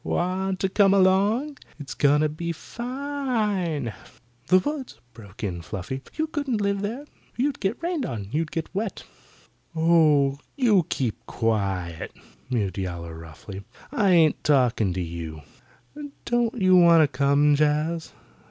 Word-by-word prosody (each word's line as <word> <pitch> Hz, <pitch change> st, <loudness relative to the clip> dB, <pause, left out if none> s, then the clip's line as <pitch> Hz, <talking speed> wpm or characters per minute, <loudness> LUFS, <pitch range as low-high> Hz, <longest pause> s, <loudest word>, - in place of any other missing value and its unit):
Want 185 Hz, +1 st, -1 dB
to 190 Hz, -, +2 dB
come 195 Hz, 0 st, +4 dB
along? 205 Hz, +9 st, +2 dB, 0.2 s
It's 135 Hz, -4 st, -7 dB
going 145 Hz, +4 st, +3 dB
to 155 Hz, -, +2 dB
be 170 Hz, +3 st, -4 dB
fine." 230 Hz, -, -2 dB, 0.5 s
"The 185 Hz, -, +6 dB
woods!" 270 Hz, +7 st, -3 dB
broke 105 Hz, -2 st, -13 dB
in 90 Hz, -4 st, -3 dB
Fluffy. 100 Hz, +9 st, -5 dB
"You 315 Hz, -, 0 dB
couldn't 285 Hz, -7 st, -2 dB
live 200 Hz, -1 st, 0 dB
there. 235 Hz, +8 st, -4 dB, 0.3 s
You'd 275 Hz, +2 st, -1 dB
be 195 Hz, -, +1 dB
rained 330 Hz, -2 st, -3 dB
on. 105 Hz, -5 st, -5 dB
You'd 155 Hz, +2 st, -1 dB
get 165 Hz, +1 st, -5 dB
wet." 200 Hz, 0 st, -3 dB, 0.7 s
"Oh, 155 Hz, -4 st, +4 dB, 0.2 s
you 215 Hz, -, +3 dB
keep 115 Hz, -3 st, -2 dB
quiet," 95 Hz, -7 st, -2 dB, 0.4 s
mewed 105 Hz, -6 st, -1 dB
Yowler 85 Hz, -3 st, -5 dB
roughly. 80 Hz, +5 st, -10 dB, 0.3 s
"I 205 Hz, -4 st, +2 dB
ain't 165 Hz, -4 st, +4 dB
talking 125 Hz, -8 st, +2 dB
to 90 Hz, -, -2 dB
you. 80 Hz, -2 st, -7 dB, 0.8 s
Don't 240 Hz, 0 st, 0 dB
you 185 Hz, -1 st, +5 dB
want 170 Hz, -2 st, +7 dB
to -, -, +3 dB
come, 140 Hz, +2 st, +3 dB
Jaz? 150 Hz, +3 st, 0 dB
160 Hz, 140 wpm, -25 LUFS, -, 0.8 s, want